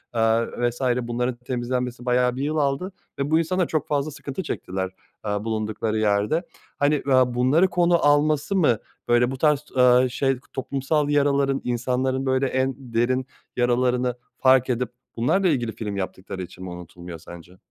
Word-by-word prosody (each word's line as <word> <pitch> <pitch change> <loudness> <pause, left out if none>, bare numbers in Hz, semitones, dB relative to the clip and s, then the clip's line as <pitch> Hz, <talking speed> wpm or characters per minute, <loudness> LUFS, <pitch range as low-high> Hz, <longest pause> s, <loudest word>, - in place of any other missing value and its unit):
eee 115 +1 +3 0.2
vs. 120 - -10 0.2
Bunların 120 +1 -2
temizlenmesi 125 0 -3
bayağı 125 0 +2
bir 135 - -4
yıl 155 +2 -1
aldı 145 +7 0 0.3
ve 140 +2 -1
bu 160 - +5
insanlar 180 +1 0
çok 155 - -1
fazla 145 +1 -1
sıkıntı 145 +5 -6
çektiler, 95 -8 -3 0.4
eee, 105 0 -1
bulundukları 110 0 -2
yerde. 105 - +1 0.4
Hani, 145 +1 +3
eee, - - -3 0.2
bunları 130 +9 +3
konu 175 -3 +2
alması 150 +4 +3
mı, 150 - +3 0.3
böyle, 120 +1 +3
bu 135 - -5
tarz, 150 0 +2
eee, 125 0 +6
şey, 135 +1 0 0.2
toplumsal 140 +3 -1
yaraların 140 -1 +2
insanların, 130 +2 -1
böyle, 130 +1 +2
en 130 0 0
derin 125 0 0 0.3
yaralarını 125 0 +1 0.2
fark 130 -1 +4
edip 125 0 0 0.3
bunlarla 185 +11 +2
ilgili 120 -8 0
film 105 -2 -4
yaptıkları 95 0 -5
için 90 +1 -11
mi 90 - -6
unutulmuyor 85 -1 -9
sence? 85 +2 -13
125 Hz, 155 wpm, -24 LUFS, 115-145 Hz, 0.4 s, eee